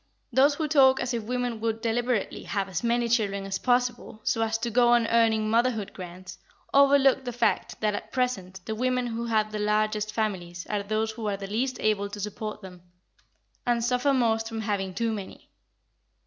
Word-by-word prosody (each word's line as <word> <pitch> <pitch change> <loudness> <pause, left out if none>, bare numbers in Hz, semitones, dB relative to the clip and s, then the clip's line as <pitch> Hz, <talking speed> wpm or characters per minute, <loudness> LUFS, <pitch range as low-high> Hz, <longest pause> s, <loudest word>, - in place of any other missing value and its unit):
Those 280 +4 +5
who 310 0 -1
talk 265 -3 +5
as 245 0 -2
if 235 - -1
women 245 -1 -2
would 225 0 -1
deliberately 235 -1 -1
have 200 -3 -2
as 190 +1 -4
many 235 0 +1
children 205 -4 0
as 195 0 -3
possible, 245 -3 0
so 225 - 0
as 225 0 +1
to 235 +1 -3
go 240 +1 +4
on 240 -1 +4
earning 225 -2 +3
motherhood 225 -2 +1
grants, 180 0 -9 0.3
overlook 275 -1 +5
the 245 - -4
fact 240 - 0
that 210 -1 +1
at - - -6
present 195 -8 -2
the 220 - -3
women 250 +2 0
who 235 0 -3
have 215 -2 +1
the 215 - -4
largest 215 0 0
families 180 -6 -3
are 210 -1 0
those 215 +2 -1
who 220 -1 -5
are 200 -1 -1
the 195 - -6
least 245 +6 -2
able 205 -2 +1
to 205 - -8
support 210 +1 -5
them, 180 -2 -11 0.8
and 240 -1 +1
suffer 250 +3 +2
most 225 -4 +1
from 225 -1 -4
having 195 -3 -2
too 230 -1 0
many. 200 -3 -8
225 Hz, 190 wpm, -27 LUFS, 210-245 Hz, 0.8 s, Those